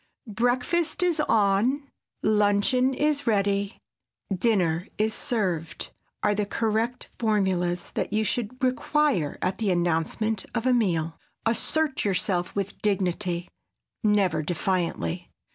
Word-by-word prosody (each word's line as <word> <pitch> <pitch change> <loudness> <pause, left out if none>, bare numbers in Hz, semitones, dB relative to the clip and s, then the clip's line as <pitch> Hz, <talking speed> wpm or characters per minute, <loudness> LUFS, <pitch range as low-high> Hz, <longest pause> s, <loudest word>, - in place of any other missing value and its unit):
"Breakfast 250 - +1
is 345 -3 +2
on," 230 +3 +2 0.3
"Luncheon 215 +5 +3
is 295 -2 +1
ready," 200 -1 +1 0.6
"Dinner 180 -4 +1
is 215 +1 +1
served" 180 -10 -2 0.3
are 210 - +3
the 205 0 -1
correct 225 +3 -1
formulas 185 -5 0
that - - -2
you 215 +1 +2
should 245 +3 -3
require 255 - +1
at 185 - -1
the 215 -3 +1
announcement 175 +5 0
of 235 0 -1
a 255 - +4
meal. 170 -9 0 0.3
Assert 290 +6 0
yourself 185 -2 0
with 200 -1 -3
dignity, 180 -3 0 0.6
never 195 -7 +3
defiantly. 170 - -1
210 Hz, 110 wpm, -26 LUFS, 180-245 Hz, 0.6 s, a